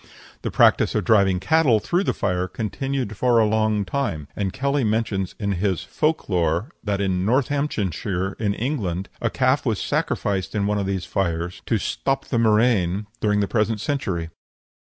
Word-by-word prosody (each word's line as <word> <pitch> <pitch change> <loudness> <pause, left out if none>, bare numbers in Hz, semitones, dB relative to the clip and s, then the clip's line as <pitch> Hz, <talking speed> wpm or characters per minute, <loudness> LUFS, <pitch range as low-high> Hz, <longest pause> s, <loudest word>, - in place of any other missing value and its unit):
The - - -2
practice - - +4
of - - +1
driving 100 -4 +3
cattle 125 - +3
through 175 - 0
the - - +2
fire 90 -1 -1
continued 120 +3 -3
for 120 +3 +2
a 110 - +5
longtime, 105 - 0
and 100 -2 -1
Kelly 140 +4 0
mentions 105 -4 -1
in 100 -2 -1
his 95 -1 0
"Folk 155 +1 -1
lore" 85 - 0
that 100 -2 -1
in 95 -2 0
Northamptonshire, 105 - -1
in 100 -2 0
England, 100 - -2
a 115 - +1
calf 130 +3 +1
was 115 -6 0
sacrificed 95 0 -1
in 100 -1 +1
one 105 0 0
of 100 - -2
these 95 -2 -2
fires 85 -2 -2
to 115 - +2
"stop 135 +6 -1
the 120 - -1
murrain" 105 -4 +2 0.2
during 105 -1 +2
the 100 - 0
present 110 0 0
century. 100 - -2
105 Hz, 165 wpm, -23 LUFS, 95-120 Hz, 0.2 s, a